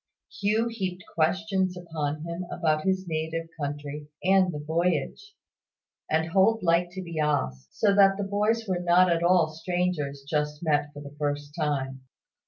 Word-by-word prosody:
Hugh 215 Hz, +3 st, +2 dB
heaped 190 Hz, -6 st, -4 dB
questions 185 Hz, +2 st, +1 dB
upon 155 Hz, -3 st, -3 dB
him 170 Hz, +2 st, -4 dB
about 155 Hz, -3 st, 0 dB
his 190 Hz, 0 st, +1 dB
native 160 Hz, 0 st, -2 dB
country 145 Hz, 0 st, -5 dB, 0.2 s
and 190 Hz, -1 st, +4 dB
the 150 Hz, -, -5 dB
voyage; 170 Hz, -, -1 dB, 0.7 s
and 160 Hz, +1 st, +1 dB
Holt 210 Hz, +4 st, +3 dB
liked 175 Hz, +1 st, +2 dB
to 190 Hz, 0 st, -5 dB
be 170 Hz, -2 st, -5 dB
asked: 65 Hz, -, -1 dB
so 205 Hz, -2 st, +4 dB
that 195 Hz, -1 st, +5 dB
the 205 Hz, -, -2 dB
boys 210 Hz, +3 st, 0 dB
were 185 Hz, -2 st, 0 dB
not 175 Hz, +1 st, +4 dB
at 170 Hz, 0 st, +1 dB
all 175 Hz, -1 st, +5 dB
like 155 Hz, -, -12 dB
strangers 165 Hz, -5 st, -2 dB
just 150 Hz, +1 st, -1 dB
met 145 Hz, -2 st, +1 dB
for 145 Hz, -, -10 dB
the 140 Hz, 0 st, -11 dB
first 145 Hz, 0 st, -2 dB
time. 135 Hz, -4 st, -2 dB
170 Hz, 165 wpm, -27 LUFS, 150-185 Hz, 0.7 s, that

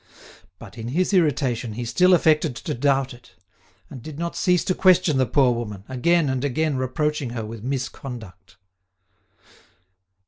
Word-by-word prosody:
But, 115 Hz, +1 st, -12 dB
in 115 Hz, -, -5 dB
his 180 Hz, +10 st, 0 dB
irritation, 130 Hz, -, +1 dB
he 120 Hz, +2 st, -5 dB
still 180 Hz, +11 st, +4 dB
affected 155 Hz, -5 st, +2 dB
to -, -, -4 dB
doubt 135 Hz, 0 st, +1 dB
it, 120 Hz, -6 st, -17 dB, 0.5 s
and 130 Hz, -, -10 dB
did 150 Hz, +2 st, -9 dB
not 170 Hz, +1 st, -4 dB
cease 180 Hz, -3 st, +2 dB
to 185 Hz, -, 0 dB
question 180 Hz, -6 st, +3 dB
the 130 Hz, -, +2 dB
poor 125 Hz, +1 st, +3 dB
woman, 105 Hz, -5 st, -6 dB
again 155 Hz, +5 st, +1 dB
and 130 Hz, -1 st, -1 dB
again 150 Hz, +2 st, 0 dB
reproaching 135 Hz, +2 st, -1 dB
her 110 Hz, -, -3 dB
with 110 Hz, 0 st, -9 dB
misconduct. 120 Hz, -8 st, -6 dB
130 Hz, 150 wpm, -23 LUFS, 120-155 Hz, 0.5 s, still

